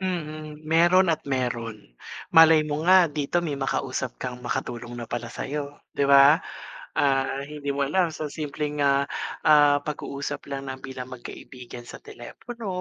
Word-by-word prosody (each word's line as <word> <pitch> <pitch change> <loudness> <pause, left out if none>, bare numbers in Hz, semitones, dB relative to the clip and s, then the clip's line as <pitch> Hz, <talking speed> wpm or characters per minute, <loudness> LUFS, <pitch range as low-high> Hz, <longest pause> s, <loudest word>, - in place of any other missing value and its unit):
Mm, 155 -4 -5
meron 170 +3 +4
at - - -3
meron. 115 - -3 0.4
Malay 160 -1 +7
mo 150 0 -3
nga 185 -2 +7
dito 155 +4 -1
may 150 - -2
makausap 130 -1 -2
kang 125 -1 -5
makatulong 120 -1 -4
na 120 - -5
pala 120 0 -4
sayo, 145 0 -5 0.2
'di 140 0 +1
ba? 140 +4 +7 0.5
Ah, 135 -1 +1
hindi 145 -2 -4
mo 140 0 -1
alam 175 +1 +1
sa 155 -1 -5
simpleng, 150 -1 -3
ah, 140 0 +3 0.4
ah, 145 -1 +6
pag-uusap 145 -1 -5
lang 135 0 -5
na 130 - -4
bilang 130 -1 -8
magkaibigan 120 0 -10
sa - - -9
telepono 230 - -9
145 Hz, 150 wpm, -25 LUFS, 130-155 Hz, 0.5 s, Malay